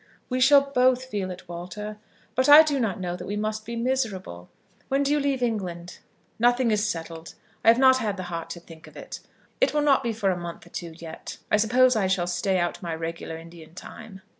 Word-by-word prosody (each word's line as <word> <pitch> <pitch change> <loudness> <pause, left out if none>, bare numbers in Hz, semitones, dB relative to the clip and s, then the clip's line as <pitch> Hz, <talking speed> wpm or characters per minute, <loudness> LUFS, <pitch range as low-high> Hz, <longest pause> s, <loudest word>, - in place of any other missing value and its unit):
"We 255 0 -1
shall 280 +2 +7
both 255 0 +3
feel 205 -7 -3
it, 180 0 -9
Walter; 180 +5 -7 0.3
but 260 +3 +1
I 300 +2 +11
do 290 -3 -1
not 215 -7 -1
know 180 -1 -3
that 180 0 -8
we 205 - -3
must 215 +1 -3
be 235 - -4
miserable. 225 - -3 0.4
When 275 +1 +1
do 280 - 0
you 295 - +3
leave 275 -3 0
England?" 180 -7 -3 0.4
"Nothing 245 0 +3
is 210 0 +1
settled. 165 -2 -6 0.3
I - - -4
have 230 +1 +7
not 260 0 +6
had 210 -5 -2
the 185 - -5
heart 170 -2 -6
to 170 - -6
think 165 -1 -15
of - - -14
it. - - -8 0.4
It - - +2
will 295 - +2
not 275 -2 +4
be 235 -3 -1
for 210 -3 0
a - - -1
month 175 -1 -7
or 175 - -17
two 170 -2 -7
yet. 165 -1 -9
I - - +5
suppose 250 +4 +4
I 200 -3 +1
shall 185 -2 +1
stay 180 +2 0
out 175 -1 -2
my 170 -3 -4
regular 165 0 -5
Indian 165 0 -13
time." 195 0 -11
210 Hz, 225 wpm, -25 LUFS, 175-250 Hz, 0.4 s, I